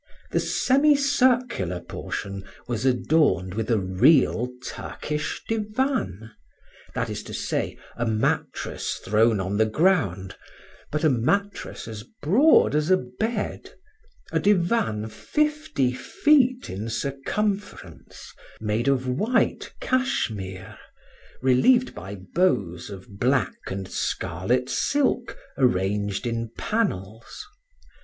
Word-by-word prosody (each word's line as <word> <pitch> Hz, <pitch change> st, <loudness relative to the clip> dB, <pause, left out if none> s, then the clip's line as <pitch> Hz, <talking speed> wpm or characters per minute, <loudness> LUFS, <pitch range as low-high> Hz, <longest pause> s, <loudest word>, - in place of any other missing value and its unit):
The -, -, +2 dB
semicircular 260 Hz, -, +2 dB
portion 100 Hz, +2 st, -5 dB, 0.2 s
was 120 Hz, +2 st, -1 dB
adorned 125 Hz, -, +2 dB
with 110 Hz, +2 st, -3 dB
a 115 Hz, -, +3 dB
real 120 Hz, -, +3 dB, 0.2 s
Turkish 150 Hz, 0 st, -4 dB
divan, 215 Hz, -, -1 dB, 0.6 s
that -, -, -1 dB
is -, -, -4 dB
to -, -, -8 dB
say, -, -, -2 dB, 0.2 s
a 120 Hz, -, -1 dB
mattress 110 Hz, 0 st, -1 dB
thrown 110 Hz, +1 st, +2 dB
on 95 Hz, +2 st, -2 dB
the 110 Hz, 0 st, +3 dB
ground, 110 Hz, -, +1 dB, 0.5 s
but 150 Hz, +1 st, -2 dB
a 155 Hz, -, +5 dB
mattress 200 Hz, -, -1 dB
as 110 Hz, -2 st, -6 dB, 0.2 s
broad 235 Hz, -, +5 dB
as 150 Hz, +2 st, +1 dB
a 185 Hz, -, +6 dB
bed, 205 Hz, -, -4 dB, 0.6 s
a -, -, +1 dB
divan 175 Hz, -, +1 dB
fifty 300 Hz, -, 0 dB
feet 255 Hz, -, +2 dB
in 105 Hz, +4 st, -5 dB
circumference, 195 Hz, -, -4 dB, 0.3 s
made 110 Hz, +3 st, -1 dB
of 130 Hz, -2 st, +2 dB
white 210 Hz, -, 0 dB
cashmere, 100 Hz, -, -2 dB, 0.6 s
relieved 240 Hz, -, +4 dB
by 95 Hz, +3 st, -7 dB
bows 95 Hz, -, 0 dB
of 100 Hz, 0 st, -11 dB
black 130 Hz, -2 st, +2 dB
and 95 Hz, 0 st, -4 dB
scarlet 95 Hz, +9 st, -1 dB
silk, 265 Hz, -, 0 dB, 0.2 s
arranged 100 Hz, -3 st, +1 dB
in 115 Hz, -1 st, -2 dB
panels. 115 Hz, -, -3 dB
125 Hz, 105 wpm, -25 LUFS, -, 0.6 s, a